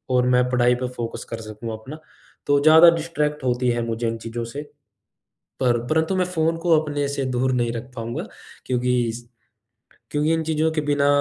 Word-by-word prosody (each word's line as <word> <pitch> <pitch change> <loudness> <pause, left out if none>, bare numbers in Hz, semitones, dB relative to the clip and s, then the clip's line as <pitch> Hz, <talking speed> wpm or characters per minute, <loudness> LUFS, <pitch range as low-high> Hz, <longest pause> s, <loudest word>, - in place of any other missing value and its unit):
और 125 0 +3
मैं 125 0 +4
पढ़ाई 125 0 +3
पे 125 0 -3
फ़ोकस 115 -2 -5
कर 115 - -4
सकूँ 110 +1 -7
अपना। 130 +9 -9 0.5
तो 145 0 +4
ज़्यादा 160 +2 +8
डिस्ट्रैक्ट 150 -3 -2
होती 125 0 +1
है 120 0 -1
मुझे 115 +1 -2
इन 115 0 -2
चीज़ों 115 +1 -5
से, 140 +6 -6 1.0
पर 120 -2 +2
परंतु 160 +5 +1
मैं 185 - +2
फ़ोन 165 -2 0
को 165 -2 +3
अपने 145 -2 -2
से 140 -1 -2
दूर 130 0 0
नहीं 120 -2 0
रख 120 +3 -7
पाऊँगा 115 0 -4 0.4
क्योंकि 125 0 +1
इस 120 +1 -7 0.9
क्योंकि 150 +2 +1
इन 160 - 0
चीज़ों 160 0 +1
के 155 - 0
बिना 145 -1 +1
130 Hz, 185 wpm, -23 LUFS, 120-155 Hz, 1.0 s, ज़्यादा